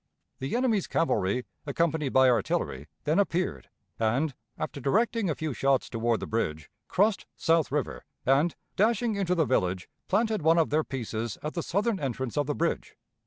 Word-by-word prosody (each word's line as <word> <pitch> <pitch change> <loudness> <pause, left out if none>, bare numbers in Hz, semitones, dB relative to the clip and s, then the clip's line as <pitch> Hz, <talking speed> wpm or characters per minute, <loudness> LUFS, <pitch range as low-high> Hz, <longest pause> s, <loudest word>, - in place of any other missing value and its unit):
The 135 - -2
enemy's 235 -6 +1
cavalry, 125 - +1 0.2
accompanied 155 0 +1
by 130 0 +5
artillery, 95 - 0 0.2
then 155 +5 +2
appeared, 185 -2 0 0.3
and, 125 +7 +1 0.2
after 140 - -4
directing 215 - +1
a 155 - 0
few 155 -3 -3
shots 135 +1 +1
toward 115 -1 0
the - - -2
bridge, 80 -10 -2 0.2
crossed 205 +2 +2
South 165 -3 +2
River, 145 -1 -2 0.2
and, 140 +6 +3 0.2
dashing 225 +2 +2
into 185 -3 +1
the 160 -3 +3
village, 95 -7 0 0.2
planted 215 0 +1
one 160 +2 +4
of 165 - +2
their 155 +1 +3
pieces 115 -5 -4
at 150 - -3
the 170 - -2
southern 200 +5 0
entrance 130 -3 -3
of 145 -1 +1
the 145 - -1
bridge. 170 0 -2
150 Hz, 165 wpm, -28 LUFS, 125-185 Hz, 0.3 s, by